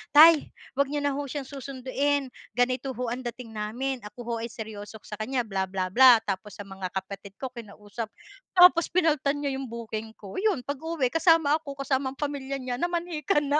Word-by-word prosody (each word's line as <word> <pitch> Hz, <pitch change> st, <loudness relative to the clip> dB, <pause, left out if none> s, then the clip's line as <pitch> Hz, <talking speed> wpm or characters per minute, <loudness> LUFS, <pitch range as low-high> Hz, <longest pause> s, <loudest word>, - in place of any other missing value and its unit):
"Tay, 315 Hz, 0 st, +8 dB, 0.3 s
wag 280 Hz, -1 st, +3 dB
niyo 290 Hz, 0 st, -2 dB
na 285 Hz, -, +2 dB
ho -, -, -3 dB
siyang 280 Hz, +1 st, -4 dB
susunduin. 275 Hz, 0 st, -2 dB, 0.2 s
Ganito 255 Hz, +2 st, 0 dB
ho 245 Hz, -1 st, -2 dB
ang 245 Hz, -, -3 dB
dating 240 Hz, -1 st, -7 dB
namin. 240 Hz, +5 st, -3 dB
Ako 210 Hz, +4 st, -16 dB
ho 235 Hz, -, -3 dB
ay 230 Hz, -, -3 dB
seryoso 220 Hz, -1 st, -8 dB
sa 210 Hz, -, -8 dB
kanya, 245 Hz, +3 st, 0 dB
bla 195 Hz, -3 st, -2 dB
bla 185 Hz, -1 st, -2 dB
bla." 255 Hz, +3 st, +9 dB
Tapos 200 Hz, 0 st, -4 dB
sa 205 Hz, -, -7 dB
mga 195 Hz, -1 st, -6 dB
kapatid 195 Hz, +1 st, -6 dB
ko 260 Hz, -2 st, -5 dB
kinausap. 215 Hz, -1 st, -7 dB, 0.5 s
Tapos 355 Hz, -2 st, +7 dB
pinalitan 305 Hz, -5 st, +2 dB
niya 280 Hz, -1 st, -1 dB
yung 265 Hz, -, -5 dB
booking 225 Hz, -1 st, -6 dB
ko. 200 Hz, -, -7 dB
Yun 390 Hz, -, +1 dB
pag-uwi 285 Hz, -2 st, -1 dB
kasama 325 Hz, -2 st, +4 dB
ako, 280 Hz, -3 st, -9 dB
kasama 265 Hz, -1 st, 0 dB
ang -, -, -35 dB
pamilya 280 Hz, -2 st, -3 dB
niya, 250 Hz, 0 st, -4 dB
namanhikan 335 Hz, -4 st, 0 dB
na. 300 Hz, -, +5 dB
260 Hz, 190 wpm, -27 LUFS, 220-290 Hz, 0.5 s, bla